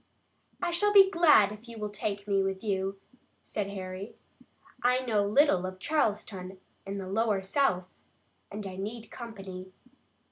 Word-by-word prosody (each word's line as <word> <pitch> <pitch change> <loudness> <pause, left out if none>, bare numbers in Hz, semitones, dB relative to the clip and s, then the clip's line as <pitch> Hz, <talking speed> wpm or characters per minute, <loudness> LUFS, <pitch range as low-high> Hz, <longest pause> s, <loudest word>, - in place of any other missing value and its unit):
"I - - +1
shall 415 +5 +2
be 390 -2 +8
glad 300 - +6
if 210 +3 -11
you 230 - -9
will 210 -1 -4
take 205 0 -3
me 195 -1 +2
with 195 +1 -2
you," 195 -2 -1 0.4
said 210 -2 -3
Harry. 190 +1 -6 0.7
"I 250 +1 +3
know 215 -4 +2
little 210 -4 +4
of 185 0 -7
Charleston 195 -7 -1 0.3
and 200 0 -4
the 190 - -6
lower 205 0 +1
South, 190 -3 +1 0.7
and 205 0 -6
I 185 -1 -6
need 220 +3 -6
company." 195 -6 -8
205 Hz, 150 wpm, -29 LUFS, 190-235 Hz, 0.7 s, be